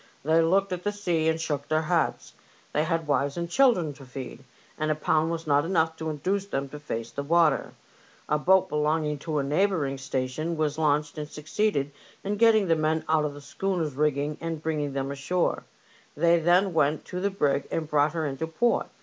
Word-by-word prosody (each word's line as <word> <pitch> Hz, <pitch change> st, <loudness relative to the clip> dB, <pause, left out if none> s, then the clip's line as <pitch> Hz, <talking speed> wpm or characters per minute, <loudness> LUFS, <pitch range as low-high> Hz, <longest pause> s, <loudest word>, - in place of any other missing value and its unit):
They 160 Hz, +2 st, +4 dB
looked 190 Hz, +4 st, +2 dB
at 180 Hz, -, -4 dB
the 205 Hz, -, -1 dB
sea 175 Hz, -6 st, 0 dB
and 160 Hz, 0 st, 0 dB
shook 145 Hz, -3 st, -3 dB
their 155 Hz, 0 st, +1 dB
heads; 170 Hz, +1 st, -1 dB, 0.4 s
they 150 Hz, -, +1 dB
had 165 Hz, -1 st, -1 dB
wives 140 Hz, 0 st, 0 dB
and 170 Hz, 0 st, -2 dB
children 180 Hz, -, +3 dB
to 140 Hz, 0 st, -14 dB
feed, 130 Hz, 0 st, -8 dB, 0.3 s
and 155 Hz, 0 st, -2 dB
a 155 Hz, -, +2 dB
pound 155 Hz, +1 st, +1 dB
was 165 Hz, 0 st, -3 dB
not 145 Hz, -1 st, +3 dB
enough 165 Hz, -2 st, +1 dB
to 160 Hz, 0 st, -3 dB
induce 190 Hz, +7 st, -2 dB
them 140 Hz, -7 st, -3 dB
to 150 Hz, -, -8 dB
face 115 Hz, -6 st, -5 dB
the 140 Hz, -, -4 dB
water. 160 Hz, 0 st, +2 dB, 0.5 s
A 150 Hz, -, +1 dB
boat 190 Hz, +4 st, +4 dB
belonging 150 Hz, -1 st, 0 dB
to 155 Hz, 0 st, -3 dB
a 140 Hz, -, +1 dB
neighbouring 150 Hz, -2 st, 0 dB
station 135 Hz, +5 st, -3 dB
was 155 Hz, 0 st, -1 dB
launched 150 Hz, -1 st, +1 dB
and 150 Hz, -, -4 dB
succeeded 150 Hz, -1 st, -1 dB, 0.3 s
in 205 Hz, +1 st, -2 dB
getting 220 Hz, -2 st, +5 dB
the 165 Hz, -, +4 dB
men 155 Hz, 0 st, 0 dB
out 155 Hz, -1 st, +2 dB
of 145 Hz, -1 st, -4 dB
the 145 Hz, -, -10 dB
schooner's 170 Hz, -1 st, -2 dB
rigging 145 Hz, +1 st, 0 dB
and 165 Hz, -1 st, -4 dB
bring 160 Hz, -2 st, -1 dB
ing 145 Hz, -1 st, -3 dB
them 135 Hz, 0 st, -2 dB
ashore. 140 Hz, +6 st, -1 dB, 0.5 s
They 170 Hz, +2 st, +4 dB
then 175 Hz, +3 st, +3 dB
went 150 Hz, -1 st, +1 dB
to 180 Hz, -, -5 dB
the 200 Hz, +2 st, +1 dB
brig 145 Hz, -8 st, 0 dB
and 160 Hz, -2 st, -2 dB
brought 150 Hz, 0 st, +2 dB
her 160 Hz, -2 st, -1 dB
into 145 Hz, +3 st, -3 dB
port. 235 Hz, +9 st, +1 dB
155 Hz, 205 wpm, -26 LUFS, 145-170 Hz, 0.5 s, getting